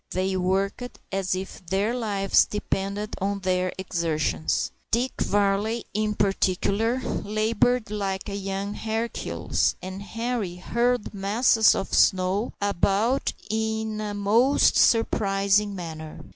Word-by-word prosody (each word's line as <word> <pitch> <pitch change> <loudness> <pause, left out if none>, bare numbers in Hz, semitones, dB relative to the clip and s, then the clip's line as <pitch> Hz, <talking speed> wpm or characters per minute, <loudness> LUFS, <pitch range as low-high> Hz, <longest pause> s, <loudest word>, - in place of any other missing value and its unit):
They 190 +1 -1
worked 195 +6 -1
as 190 -1 0
if 190 0 -7
their 195 +6 0
lives 205 -5 +2
depended 205 0 -3
on 200 +1 -1
their 185 -1 0
exertions. 165 -4 -1 0.2
Dick 245 +3 +1
Varley, 205 +3 +1
in 215 0 0
particular, 200 +4 +1
laboured 215 +2 0
like 195 -2 -3
a 200 - -5
young 195 +1 -3
Hercules, 225 +2 -1
and 190 +1 -7
Henri 225 -3 -3
hurled 235 +6 0
masses 215 +3 +4
of 195 - -4
snow 190 +4 +3
about 205 +6 +1
in 220 0 -2
a 210 -1 -4
most 225 +7 +3
surprising 200 -2 +3
manner. 160 -3 -7
200 Hz, 115 wpm, -25 LUFS, 190-220 Hz, 0.2 s, masses